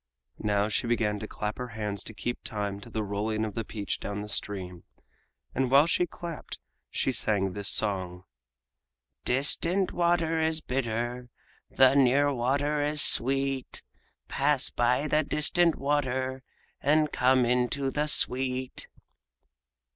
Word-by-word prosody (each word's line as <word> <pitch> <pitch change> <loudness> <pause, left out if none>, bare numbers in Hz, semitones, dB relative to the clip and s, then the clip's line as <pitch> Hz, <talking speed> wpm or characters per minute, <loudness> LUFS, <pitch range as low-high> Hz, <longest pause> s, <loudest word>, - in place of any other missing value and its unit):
Now 105 -1 +1
she 110 +2 -1
began 110 -3 0
to 110 - -6
clap 105 +2 -5
her 125 - -4
hands 105 -2 -2
to 110 - -7
keep 120 +3 -4
time 100 -2 -4
to 115 - -11
the 110 -1 -3
rolling 105 +2 -2
of 105 - -5
the 115 - -3
peach 105 -2 -4
down 105 +1 -5
stream, 90 -4 -3 0.7
and 130 0 0
while 140 +3 +6
she 175 +1 +1
clapped 170 0 -8 0.3
she 130 - 0
sang 100 -5 +1
this 100 0 0
song: 95 -4 0 1.0
"Distant 165 +8 +1
water 170 -2 +1
is 160 0 +2
bitter, 120 -2 -3 0.4
The 130 0 +5
near 140 +1 +4
water 140 +4 0
is 150 +1 0
sweet; 135 0 +1 0.4
Pass 140 -1 +1
by 125 +4 +1
the 150 0 +2
distant 155 +3 +1
water 130 -2 -1 0.4
And 150 +1 +2
come 130 0 +3
into 125 +3 0
the 150 +2 -1
sweet." 130 -2 +2
125 Hz, 135 wpm, -28 LUFS, 110-145 Hz, 1.0 s, while